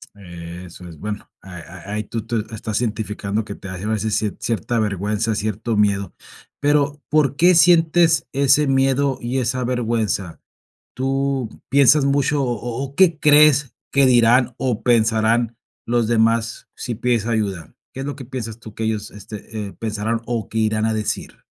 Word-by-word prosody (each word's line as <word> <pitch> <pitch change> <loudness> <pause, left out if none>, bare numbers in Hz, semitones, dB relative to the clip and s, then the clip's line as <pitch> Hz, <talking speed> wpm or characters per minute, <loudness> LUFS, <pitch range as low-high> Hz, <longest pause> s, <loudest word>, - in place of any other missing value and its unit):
Eso 85 -1 -10
es, 80 -3 -12
bueno, 105 0 -6
a 95 -2 -11
a 90 +3 -10
ahí 105 0 -2
tú 115 +1 -4
tú 115 -2 -1
estás 110 +1 -3
identificando 105 -1 -2
que 100 - -6
te 100 - -10
hace 95 +1 -6
a - - -2
veces 110 -1 -1
cier 105 -2 -2
cierta 115 0 -2
vergüenza, 105 +1 -1
cierto 110 +2 -2
miedo. 100 -1 +1 0.5
Pero, 145 0 +1
¿por 150 -2 +2
qué 175 +4 +5
sientes 165 -4 +4
ese 140 +2 +3
miedo 135 0 +2
y 125 +3 -2
esa 125 +1 -1
vergüenza? 115 -7 -1 0.6
¿Tú 135 -2 -1 0.2
piensas 140 +1 +5
mucho 140 +1 +1
o 125 - 0
o 120 +3 -5
o 135 +1 -9
qué 175 -3 +4
crees 150 -3 +5 0.2
que 140 -1 +4
dirán 120 0 +4
o 125 -5 -2
pensarán 115 0 +2 0.3
los 120 -1 0
demás 115 0 +1
si 120 - -5
pides 120 -1 0
ayuda? 100 -8 -2 0.2
¿Qué 135 - -7
es 135 - -4
lo 145 - -4
que 135 - -8
piensas 115 -3 -6
tú 110 -2 -12
que 110 - -4
ellos, 110 -1 -2
este, 105 +1 -8
eh, - - -11
pensarán 110 +1 -3
o 115 -4 -3
qué 110 - -8
irán 110 0 +1
a 110 - 0
decir? 105 -1 -4
115 Hz, 170 wpm, -21 LUFS, 105-135 Hz, 0.6 s, qué